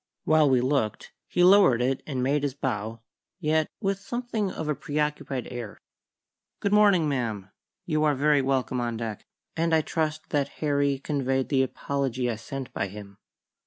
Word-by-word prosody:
While 155 -2 +4
we 130 -2 +4
looked, 130 -5 -1
he 180 - +2
lowered 185 -10 +6
it 130 +2 0
and 130 -4 -2
made 140 +3 +2
his 140 -2 -2
bow, 115 -4 -3 0.4
yet 155 -2 +1
with 195 -2 -1
something 235 -2 -2
of 160 - -5
a 150 - +1
preoccupied 150 -2 -2
air. 120 -4 -6 0.8
"Good 200 - 0
morning, 200 -6 +5
ma'am. 110 -8 -2 0.3
You 155 -4 +1
are 150 -1 +3
very 145 +1 +3
welcome 130 -2 0
on 120 -1 -2
deck, 110 -2 -5 0.3
and 165 0 +2
I 160 - +4
trust 155 0 -2
that 145 -2 +1
Harry 140 -2 +1
conveyed 135 -2 -1
the 135 -2 +3
apology 130 -2 -1
I 110 - -4
sent 135 +3 -7
by 100 - -1
him." 100 0 -11
140 Hz, 165 wpm, -26 LUFS, 125-155 Hz, 0.8 s, lowered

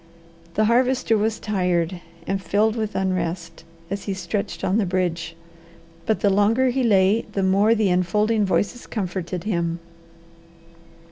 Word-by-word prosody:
The 215 - +3
Harvester 250 +1 +2
was 220 +1 0
tired 180 -4 -1 0.2
and 195 0 -2
filled 215 +3 +1
with 215 -2 -3
unrest 170 -3 -2 0.3
as 200 0 -4
he 195 - -2
stretched 200 +3 -4
on 190 +4 +2
the 210 - +1
bridge, 175 -2 -2 0.7
but 220 - +1
the 200 - +3
longer 225 +6 +3
he 265 +2 0
lay 205 -1 +3
the 195 - 0
more 200 +4 +4
the 215 -3 +2
enfolding 210 +5 +1
voices 205 +5 -1
comforted 180 -4 -4
him. 170 -5 -1
200 Hz, 140 wpm, -23 LUFS, 180-220 Hz, 0.7 s, more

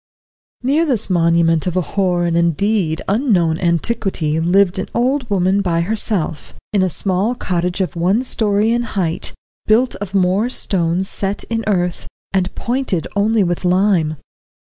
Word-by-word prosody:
Near 285 +6 +2
this 250 - 0
monument 170 -1 +2
of 180 0 -1
a - - +3
hoar 180 -3 +1
and 170 -1 0
indeed 170 0 +1
unknown 190 - +1
antiquity 170 -2 0
lived 180 +2 +2
an 190 - -3
old 250 +1 0
woman 195 0 +2
by 170 -3 0
herself, 185 -5 -2 0.2
in 200 - +3
a 185 - +2
small 195 - -1
cottage 180 -3 -2
of 185 - -2
one 185 +8 +1
story 215 -3 +1
in 240 +1 +1
height, 190 -8 -2 0.4
built 235 +4 +3
of 200 0 -6
moor 195 +5 +2
stones 180 -5 0
set 195 0 -3
in 225 0 -1
earth, 180 -4 -1 0.3
and 185 -1 0
pointed 240 -8 -1
only 210 +1 +2
with 175 0 -2
lime. 180 -4 +2
190 Hz, 150 wpm, -18 LUFS, 170-215 Hz, 0.4 s, a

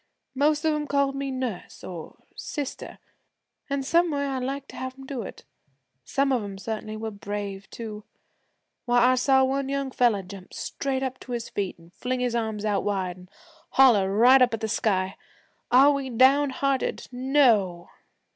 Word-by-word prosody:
Most 295 +3 +2
of 315 - +3
'em 300 -1 -2
called 280 -1 +1
me 275 0 -3
"Nurse" 255 -7 -5
or 170 -4 -9
"Sister," 285 -3 -6 0.7
an' 280 0 -1
some 340 +5 +3
way 285 -2 -1
I 270 -2 -2
liked 275 +2 -4
to - - -11
have 260 0 -6
'em 270 - -11
do 265 -3 -4
it. - - -9 0.6
Some 275 - 0
of 250 -3 +2
'em 200 -1 -7
certainly 215 +1 -5
were 220 0 -4
brave, 200 -1 -6
too. 215 -2 -7 0.8
Why, 245 +1 +4
I - - +4
saw 265 +1 +4
one 270 +1 0
young 275 -1 -2
fella 235 -6 +2
jump 185 0 -11
straight 270 -1 -3
up 260 -1 -3
to 250 - -7
his 235 -1 -4
feet 195 -2 -3
an' 165 0 -19
fling 255 +6 -3
his 245 -1 0
arms 220 -2 -2
out 205 -2 +1
wide, 190 -3 -2
an' 180 0 -15 0.5
holler 220 -8 +6
right 245 +6 +6
up 245 -2 +4
at 225 - -10
the 220 - -1
sky, 190 -4 0 0.5
"Are 270 +4 +7
we 280 -2 -2
downhearted? 270 +2 +2
No!" 245 -9 +2
250 Hz, 175 wpm, -26 LUFS, 205-275 Hz, 0.8 s, Are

